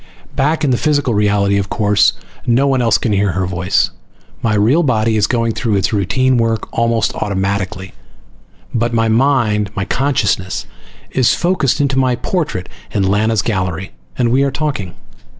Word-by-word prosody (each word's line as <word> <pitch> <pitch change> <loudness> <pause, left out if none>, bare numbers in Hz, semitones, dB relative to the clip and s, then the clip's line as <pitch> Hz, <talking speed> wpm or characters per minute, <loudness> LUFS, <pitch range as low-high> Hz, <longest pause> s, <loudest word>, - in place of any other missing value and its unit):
Back 155 +3 +1
in 140 - +2
the 125 - +1
physical 145 -5 +1
reality, 100 -1 +2
of 95 -1 -3
course, 105 -2 +3 0.3
no 120 +3 +3
one 135 -2 +2
else 115 -3 +3
can 110 - -1
hear 100 -2 +1
her 95 +1 -1
voice. 90 +1 0 0.5
My 110 -2 +1
real 115 +11 +3
body 115 -6 +1
is 105 -1 +2
going 115 -2 0
through 110 -2 -1
its 100 +4 0
routine 125 +6 +1
work 115 -2 0
almost 115 -1 +1
automatically 95 -2 -3 0.8
but 120 0 0
my 115 0 +2
mind, 110 -4 +2
my 100 - -2
consciousness, 130 -9 -1 0.5
is 130 -3 +2
focused 170 -7 +1
into 135 -2 +1
my 130 -2 +2
portrait 150 - -3 0.2
in 100 - -1
Lana's 105 +2 +1
gallery, 95 -4 -2 0.3
and 120 -2 +1
we 130 +3 +3
are 140 - +2
talking. 135 - -3
115 Hz, 165 wpm, -16 LUFS, 100-130 Hz, 0.8 s, course